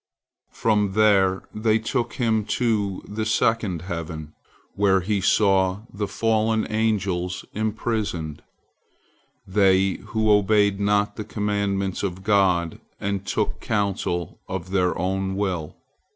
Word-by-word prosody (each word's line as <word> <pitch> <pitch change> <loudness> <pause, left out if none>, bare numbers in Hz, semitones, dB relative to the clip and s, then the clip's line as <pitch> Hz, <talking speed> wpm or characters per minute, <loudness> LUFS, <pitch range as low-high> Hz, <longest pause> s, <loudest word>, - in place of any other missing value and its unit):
From 105 -3 +1
there 100 -3 +3
they 110 0 +2
took 115 +1 -2
him 110 -3 +1
to 105 -6 0
the 110 +1 -3
second 110 -6 +1
heaven, 80 -4 -6 0.4
where 95 -2 +3
he 100 +2 -1
saw 95 -1 +3
the 100 0 -2
fallen 110 0 +1
angels 95 -5 -1
imprisoned, 105 -7 -2 1.0
they 95 -1 +3
who 110 -1 +1
obeyed 105 -1 +3
not 100 0 +1
the 110 - -3
commandments 100 -2 -1
of 95 -1 -4
God, 95 -5 +2 0.2
and 100 -1 -3
took - - -1
counsel 95 -5 -2
of 95 -1 -5
their 90 -2 +1
own 95 +2 -1
will. 95 -6 -2
100 Hz, 115 wpm, -24 LUFS, 95-110 Hz, 1.0 s, there